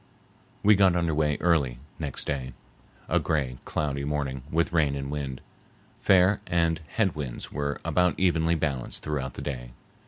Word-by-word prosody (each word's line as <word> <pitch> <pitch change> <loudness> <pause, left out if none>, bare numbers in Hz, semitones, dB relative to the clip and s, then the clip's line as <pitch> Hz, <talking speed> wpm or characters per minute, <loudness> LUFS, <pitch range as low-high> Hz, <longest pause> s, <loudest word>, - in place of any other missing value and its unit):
We 105 - +7
got 95 -3 +5
under 85 -2 +1
way 75 -1 +1
early 75 -8 +2 0.2
next 75 -4 -1
day,—a 65 -3 -4
gray, 70 -6 -1
cloudy 70 -2 -2
morning 70 -2 -2
with 85 +1 +1
rain 75 -4 +3
and 70 0 -4
wind. 70 -3 -4 0.6
Fair 95 +1 +5
and 85 -1 +1
head 100 -7 +2
winds 70 -5 -6
were 70 0 -2
about 90 -1 +2
evenly 85 -2 +3
balanced 70 -6 -2
throughout 70 -4 -3
the - - -6
day. 60 -4 -5
75 Hz, 150 wpm, -27 LUFS, 70-85 Hz, 0.6 s, We